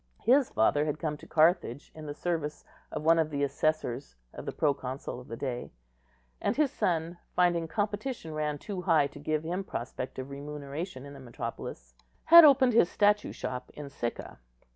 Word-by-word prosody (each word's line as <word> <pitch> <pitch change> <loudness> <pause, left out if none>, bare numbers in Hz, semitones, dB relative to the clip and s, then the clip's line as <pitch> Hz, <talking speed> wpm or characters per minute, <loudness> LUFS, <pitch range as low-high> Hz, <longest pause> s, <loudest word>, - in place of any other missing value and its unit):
His 260 +3 +4
father 145 +7 +2
had 150 -1 -2
come 155 -2 -2
to - - -14
Carthage 155 -5 +2
in 155 -1 -9
the 145 - -5
service 155 -3 -3 0.3
of - - -4
one 165 +1 +5
of 160 -1 +1
the 145 -1 -1
assessors 140 - -1 0.2
of - - -9
the - - -1
proconsul 135 -4 -2
of 125 - -13
the 115 - -6
day; 125 -2 -4 0.7
and 210 - 0
his 290 -3 +2
son, 170 0 -1 0.2
finding 175 -2 +2
competition 205 -1 -3
ran 150 -1 -1
too 190 +4 -5
high 165 -5 +4
to 145 +1 -8
give 155 +1 -1
him 180 +4 -2
prospect 130 -4 -5
of 130 +1 -6
remuneration 145 +1 -6
in 140 - -10
the 140 - -11
metropolis, 115 - -7 0.3
had 335 +1 +10
opened 270 -4 +6
his 200 -6 +5
statue 210 0 +2
shop 125 0 -5
in 145 -2 -8
Sicca. 120 - -5
155 Hz, 180 wpm, -29 LUFS, 140-180 Hz, 0.7 s, had